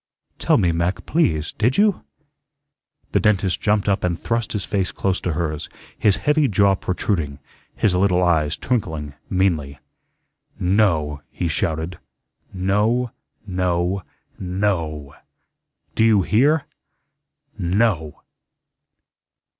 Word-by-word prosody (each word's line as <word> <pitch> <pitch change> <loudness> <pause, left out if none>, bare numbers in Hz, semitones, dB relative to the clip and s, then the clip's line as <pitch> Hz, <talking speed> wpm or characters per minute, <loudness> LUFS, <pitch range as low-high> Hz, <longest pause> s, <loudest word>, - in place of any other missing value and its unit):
"Tell - - +3
me, 90 -2 +2
Mac, 85 +3 -1
please, 80 - +1
did 115 +4 0
you?" 205 -1 +3 1.1
The - - +3
dentist 95 -3 +1
jumped 105 -1 +1
up 100 -1 +1
and 85 -2 0
thrust 115 -1 -2
his 105 -3 -2
face 95 -3 -1
close 95 -1 -1
to 90 - -1
hers, 75 -2 -3 0.3
his 100 -3 +2
heavy 150 -1 +4
jaw 100 -2 +3
protruding, 90 -6 -2 0.4
his 100 - +2
little 90 -1 +3
eyes 80 -3 +2
twinkling 80 - -2 0.2
meanly. 80 -7 0 0.8
"No," 85 -7 +1
he 90 - -3
shouted. 80 +1 -2 0.5
"No, 105 +6 +1 0.3
no, 90 0 0 0.4
NO. 85 -7 -2 0.8
Do - - +2
you 110 -4 +4
hear? 140 - +3 0.9
NO." 90 -4 +1
95 Hz, 110 wpm, -21 LUFS, 85-105 Hz, 1.1 s, heavy